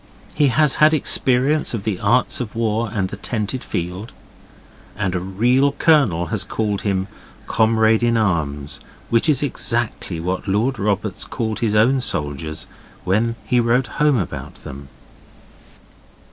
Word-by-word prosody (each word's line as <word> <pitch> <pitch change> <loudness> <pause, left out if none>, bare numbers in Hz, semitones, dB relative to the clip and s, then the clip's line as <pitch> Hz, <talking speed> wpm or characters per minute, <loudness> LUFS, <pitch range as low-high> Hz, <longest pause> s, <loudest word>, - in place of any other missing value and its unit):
He 145 -1 +3
has 135 +3 +2
had 155 +1 +6
experience 135 0 +2
of 105 - -5
the 105 -4 -2
arts 125 +1 +2
of 115 -3 -6
war 115 0 0
and 95 -3 -1
the 100 - -7
tented 110 +4 -4
field. 90 +6 -5 0.8
And 95 -3 -2
a 90 - -1
real 120 +10 +1
colonel 135 - +3
has - - +1
called 105 -3 -2
him 95 -2 -1 0.4
'Comrade 110 0 +2
in 120 -1 +2
Arms', 75 -9 -1 0.3
which 115 +6 +3
is 145 -2 +3
exactly 115 - -2
what 90 +4 -3
Lord 110 +7 0
Roberts 100 0 -1
called 110 -3 -3
his 110 -3 0
own 125 +5 +3
soldiers 75 - -3 0.4
when 110 +5 0
he 125 -1 +2
wrote 120 +2 +2 0.2
home 150 -3 +4
about 95 -8 -5
them. 70 0 -9
110 Hz, 145 wpm, -20 LUFS, 95-125 Hz, 0.8 s, had